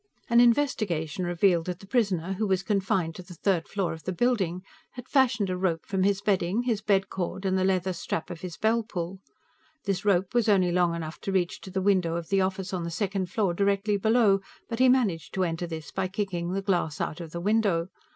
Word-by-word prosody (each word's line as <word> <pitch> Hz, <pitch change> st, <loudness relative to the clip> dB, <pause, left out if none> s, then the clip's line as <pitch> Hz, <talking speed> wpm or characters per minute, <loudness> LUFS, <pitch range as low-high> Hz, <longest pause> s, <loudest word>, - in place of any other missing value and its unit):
An 235 Hz, -, +6 dB
investigation 205 Hz, -, +2 dB
revealed 175 Hz, -1 st, +2 dB
that 180 Hz, -1 st, -3 dB
the 195 Hz, -, -12 dB
prisoner, 195 Hz, -5 st, 0 dB
who 210 Hz, +3 st, -1 dB
was 190 Hz, -1 st, +1 dB
confined 190 Hz, -5 st, 0 dB
on 180 Hz, -, -9 dB
the 180 Hz, -, -10 dB
third 175 Hz, -1 st, 0 dB
floor 195 Hz, -4 st, -2 dB
of 160 Hz, -, -9 dB
the 185 Hz, -, -3 dB
building, 185 Hz, -4 st, 0 dB, 0.3 s
had 250 Hz, -1 st, -9 dB
fashioned 240 Hz, -7 st, +2 dB
a -, -, -1 dB
rope 180 Hz, -3 st, -1 dB
from 190 Hz, -1 st, -1 dB
his 195 Hz, 0 st, +2 dB
bedding, 200 Hz, +2 st, +1 dB
his 230 Hz, -4 st, 0 dB
bed 195 Hz, -2 st, +2 dB
cord, 190 Hz, +1 st, -4 dB
and 190 Hz, 0 st, +1 dB
the 190 Hz, -, +1 dB
leather 185 Hz, -1 st, +1 dB
strap 165 Hz, -, -4 dB
of 170 Hz, -1 st, -8 dB
his 175 Hz, -4 st, -6 dB
bell 225 Hz, +4 st, +2 dB
pull. 185 Hz, -4 st, -5 dB, 0.7 s
This 195 Hz, -2 st, -1 dB
rope 190 Hz, -3 st, +2 dB
was 235 Hz, -2 st, +2 dB
only 185 Hz, -4 st, +4 dB
long 175 Hz, -1 st, +2 dB
enough 160 Hz, -1 st, -6 dB
to 195 Hz, -, -3 dB
reach 180 Hz, -2 st, 0 dB
to -, -, -9 dB
the 190 Hz, 0 st, -2 dB
window 185 Hz, -4 st, +2 dB
of 170 Hz, -1 st, -5 dB
the 195 Hz, -1 st, +3 dB
office 190 Hz, 0 st, -2 dB
on 180 Hz, -2 st, -2 dB
the 170 Hz, -, -3 dB
second 190 Hz, +1 st, -2 dB
floor, 190 Hz, -2 st, 0 dB
directly 200 Hz, +2 st, +1 dB
below, 220 Hz, -1 st, +3 dB, 0.3 s
but 230 Hz, -, -4 dB
he 260 Hz, 0 st, +6 dB
managed 210 Hz, -, +1 dB
to 190 Hz, -, +1 dB
enter 170 Hz, 0 st, -2 dB
this 160 Hz, -4 st, -7 dB
by 190 Hz, -1 st, -1 dB
kicking 185 Hz, -3 st, -3 dB
the 195 Hz, 0 st, -2 dB
glass 175 Hz, -6 st, 0 dB
out 160 Hz, -, -3 dB
of 165 Hz, -, -7 dB
the 170 Hz, -, -5 dB
window. 195 Hz, -3 st, +1 dB
190 Hz, 225 wpm, -27 LUFS, 175-205 Hz, 0.7 s, An